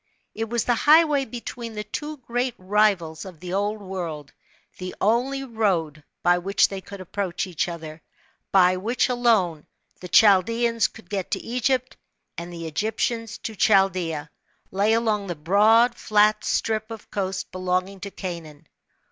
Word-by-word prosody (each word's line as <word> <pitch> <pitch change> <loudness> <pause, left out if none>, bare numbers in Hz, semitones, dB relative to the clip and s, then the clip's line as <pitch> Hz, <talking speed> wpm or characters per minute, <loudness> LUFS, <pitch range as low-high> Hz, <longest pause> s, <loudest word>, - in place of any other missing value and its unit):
It 225 0 -4
was 235 -1 0
the 245 - +3
highway 295 +2 +4
between 235 -1 -7
the 210 - -3
two 295 +8 -5
great 245 -1 -2
rivals 185 -5 +1
of 185 -5 -11
the 180 +1 -6
Old 205 +2 -1
World; 170 -7 -6 0.5
the 185 0 -6
only 250 +6 +1
road 185 - -1 0.2
by 175 0 +4
which 195 +3 +2
the} 195 -1 -6
could 200 +1 -10
approach 185 0 -3
each 175 -4 -2
other, 160 -2 -7 0.5
by 185 -1 +5
which 230 +7 0
alone, 220 -11 +1 0.3
the 180 - -9
Chaldeans 230 +4 +4
could 210 -4 -16
get 195 -1 -3
to - - -1
Egypt, 250 +2 -1 0.4
and 170 +1 -7
the 170 -1 -7
Egyp 205 +8 -2
tians 230 -2 -2
to 220 - -4
Chaldea, 185 -7 +2 0.4
lay 200 +3 +2
along 215 -3 +1
the 175 - -3
broad 215 +9 +4
flat 210 -1 +2
strip 220 0 -1
of 225 -2 -10
coast 195 -1 -3
belonging 185 +1 -2
to 200 - -6
Canaan. 170 -6 -7
200 Hz, 155 wpm, -24 LUFS, 180-230 Hz, 0.5 s, by